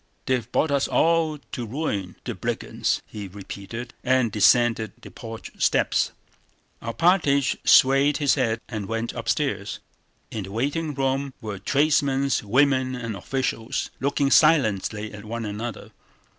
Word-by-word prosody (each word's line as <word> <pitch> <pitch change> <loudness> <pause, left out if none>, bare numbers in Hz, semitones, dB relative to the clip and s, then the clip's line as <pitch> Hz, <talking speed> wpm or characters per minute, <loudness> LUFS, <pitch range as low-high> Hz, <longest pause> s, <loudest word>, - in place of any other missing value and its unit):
"They've 125 -3 -1
brought 155 - +1
us 140 -1 +2
all 165 -2 +2
to 125 - -4
ruin... 105 - -3
the - - -4
brigands!" - - -2
he 105 -2 -7
repeated, 100 +5 -8
and 130 -3 +2
descended 110 0 +3
the - - -12
porch 115 -1 -9
steps. - - +2 0.7
Alpátych 140 +1 +2
swayed 135 +2 +5
his 145 -3 +3
head 110 0 0
and 110 -4 -5
went 115 +2 -3
upstairs. 115 -3 -2 0.5
In 105 -4 -4
the 95 - -10
waiting 145 +7 -2
room 135 0 -1
were 105 -3 -6
tradesmen, 140 +2 +2
women, 130 +3 +2
and 115 -3 -4
officials, 120 +2 -2
looking 140 0 +1
silently 110 -8 +3
at 100 -1 -9
one 115 +1 -5
another. 105 +1 -6
125 Hz, 130 wpm, -24 LUFS, 110-140 Hz, 0.7 s, swayed